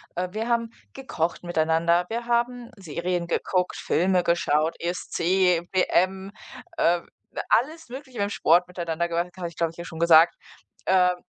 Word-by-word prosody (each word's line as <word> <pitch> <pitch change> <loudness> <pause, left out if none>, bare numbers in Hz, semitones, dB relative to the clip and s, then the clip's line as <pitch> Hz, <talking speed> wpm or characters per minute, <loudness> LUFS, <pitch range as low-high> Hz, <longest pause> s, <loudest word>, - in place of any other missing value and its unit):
äh. 180 +1 -2
Wir 220 +2 -3
haben 230 -1 0 0.2
gekocht 175 -12 -3
miteinander. 170 +1 +1
Wir 235 +1 -3
haben 240 0 -1
Serien 175 0 -3
geguckt, 180 +1 -1
Filme 180 +1 +1
geschaut, 165 -1 +1
ESC, 180 0 +1
WM, 190 +1 +1 0.5
äh, 170 0 +2 0.5
alles 310 +5 +1
Mögliche 260 -2 -9
im 200 0 0
Sport 175 -2 +3
miteinander 170 -1 -3
gemacht. 170 +1 -1
Das - - -24
habe 170 - -3
ich, 170 - -18
glaube 165 0 0
ich, - - -20
dir 170 - -7
schon 160 0 -9
gesagt, 165 0 +6 0.5
ähm. 180 -1 +3
180 Hz, 155 wpm, -25 LUFS, 170-200 Hz, 0.5 s, gesagt